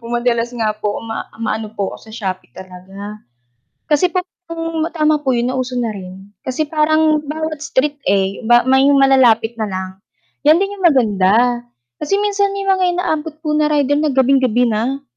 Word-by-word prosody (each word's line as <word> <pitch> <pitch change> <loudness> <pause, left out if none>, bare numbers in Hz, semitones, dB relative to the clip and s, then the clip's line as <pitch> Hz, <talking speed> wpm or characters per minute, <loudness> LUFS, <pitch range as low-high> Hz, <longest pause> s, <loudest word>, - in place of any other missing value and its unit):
po 230 - -11
madalas 240 0 0
nga 225 -3 0
po 210 -1 -4
ma 225 0 -5
maano 220 -1 -3
po 200 -3 -3
ako - - -13
sa - - -11
Shopee 185 - -5
talaga. 195 +3 -10 0.7
Kasi 300 +4 +3
pong 335 -3 -4
tama 305 -1 +2
po 270 -3 0
'yon 240 +1 0
na 260 - -3
uso 255 0 -3
na 240 -2 -1
rin, 190 0 -10
kasi 260 +4 -1
parang 310 0 +2
bawat 310 +1 -4
street, 285 +1 -1
eh, 195 0 +1
ba 240 0 +5
may 265 +1 +4
malalapit 245 -4 +4
na 215 - -1
lang. 190 -1 -4 0.6
'Yan 315 +3 +6
din 395 0 -1
'yong 375 -3 +4
maganda, 240 - +2 0.4
kasi 395 - 0
minsan 405 -1 0
may 395 - -3
mga 385 -1 +1
inaabot 315 -3 -2
po 305 - -1
na 305 0 +2
rider 290 -1 +1
na 305 -1 +1
gabing-gabi 260 -2 +3
na. 240 +5 -2
260 Hz, 180 wpm, -17 LUFS, 220-305 Hz, 0.7 s, Yan